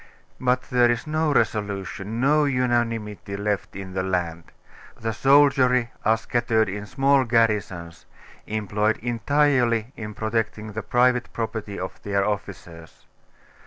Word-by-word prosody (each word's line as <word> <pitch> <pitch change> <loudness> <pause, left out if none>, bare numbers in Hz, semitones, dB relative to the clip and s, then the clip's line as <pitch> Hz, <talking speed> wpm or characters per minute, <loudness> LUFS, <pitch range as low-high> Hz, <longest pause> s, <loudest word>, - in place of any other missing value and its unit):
But 125 0 +1
there 120 -1 +4
is 120 0 -1
no 155 0 0
resolution, 105 -2 -1
no 150 +4 +3
unanimity 115 -6 -1
left 100 0 -2
in 95 -1 -7
the 95 - -1
land. 85 -3 -2 0.5
The 115 0 -2
soldiery 135 -2 +4
are 110 +1 +3
scattered 115 -1 +1
in 105 +2 -5
small 135 +2 +3
garrisons, 105 -8 0 0.4
employed 105 0 0
entirely 120 -1 +1
in 105 -2 -7
protecting 110 -1 -2
the 110 +1 -4
private 125 +3 +2
property 110 -3 -4
of 95 - -6
their 100 -1 0
officers. 90 -5 -6
110 Hz, 125 wpm, -24 LUFS, 100-125 Hz, 0.5 s, there